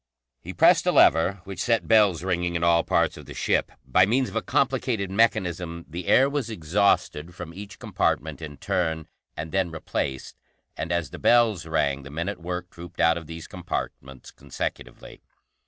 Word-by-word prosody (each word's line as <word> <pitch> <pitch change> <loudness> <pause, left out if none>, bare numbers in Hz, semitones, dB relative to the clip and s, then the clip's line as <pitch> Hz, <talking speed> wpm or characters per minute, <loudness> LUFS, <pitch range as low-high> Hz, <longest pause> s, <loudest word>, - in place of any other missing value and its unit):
He - - -8
pressed - - +4
a - - +5
lever, 90 +3 +4
which 95 -3 -6
set 115 -1 +1
bells 105 -7 +4
ringing 90 -2 -1
in 85 - -1
all 85 -1 +4
parts - - +1
of - - -12
the - - -9
ship. - - 0
By 90 +8 +4
means 130 +4 +1
of - - -12
a 115 - +1
complicated 125 -8 0
mechanism, 90 -6 0
the 85 +2 -7
air 135 - +5
was 140 -4 -2
exhausted 90 -3 0
from 85 -2 -8
each 100 +2 -10
compartment - - -1
in 75 -2 -8
turn, 80 -3 -2 0.3
and 80 +1 -5
then 95 -2 0
replaced, 70 -4 -4 0.4
and 80 - -4
as 85 -5 -1
the - - -8
bells 110 -8 +3
rang, 70 -3 0
the 70 - -11
men 85 +6 -3
at 100 - -6
work 90 +1 -5
trooped 85 0 -12
out 80 +2 +4
of 85 -2 -7
these 80 0 -8
compartments 65 0 -6
consecutively. - - -7
85 Hz, 180 wpm, -25 LUFS, 80-100 Hz, 0.4 s, a